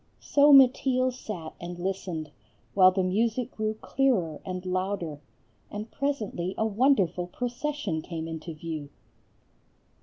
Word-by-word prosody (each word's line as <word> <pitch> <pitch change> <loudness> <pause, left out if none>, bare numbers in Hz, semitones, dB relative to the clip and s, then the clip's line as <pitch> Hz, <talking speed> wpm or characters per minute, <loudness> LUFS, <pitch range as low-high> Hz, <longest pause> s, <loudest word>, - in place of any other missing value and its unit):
So 290 +1 +4
Mateel 260 -1 +5
sat 180 -10 -7
and 175 0 -6
listened, 175 -4 -3 0.4
while 185 -2 +7
the 185 0 0
music 225 +6 0
grew 215 0 -2
clearer 200 - +1
and 185 -1 -5
louder; 185 -5 -2 0.5
and 210 +2 -6
presently 215 -10 -2
a 220 - +1
wonderful 210 - +2
procession 245 - -3
came 165 -1 -5
into 160 +1 -6
view. 155 -2 -6
195 Hz, 120 wpm, -27 LUFS, 170-250 Hz, 0.5 s, while